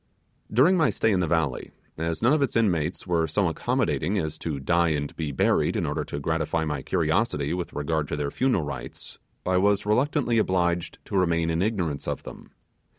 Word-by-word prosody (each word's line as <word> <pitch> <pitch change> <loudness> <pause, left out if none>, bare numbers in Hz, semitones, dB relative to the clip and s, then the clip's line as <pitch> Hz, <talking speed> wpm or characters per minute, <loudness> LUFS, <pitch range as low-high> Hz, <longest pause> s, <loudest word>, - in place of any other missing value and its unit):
During 145 - +5
my 160 -3 +4
stay 110 - +1
in 95 - +2
the 90 - +1
valley, 80 -5 0 0.3
as 80 +3 -3
none 125 +5 +5
of 155 - +2
its 140 - 0
inmates 90 -8 +1
were 85 -3 +1
so 75 - +1
accommodating 95 +7 0
as 80 -4 -3
to 75 -4 -3
die 85 +4 +2
and 75 -2 -2
be 80 -3 -3
buried 65 - +2
in - - 0
order - - -2
to 70 - -5
gratify 80 +1 -1
my 75 -3 -2
curiosity 70 +3 0
with 90 -1 -4
regard 75 +1 -1
to - - -3
their 70 -1 -2
funeral 125 -10 +1
rites, 65 -4 -7 0.3
I 90 0 +2
was 100 +2 +2
reluctantly 120 +2 +2
obliged 90 -4 0
to - - -5
remain 85 -2 +2
in 80 +1 0
ignorance 90 -9 -1
of - - -3
them. - - -11
85 Hz, 195 wpm, -26 LUFS, 75-100 Hz, 0.3 s, During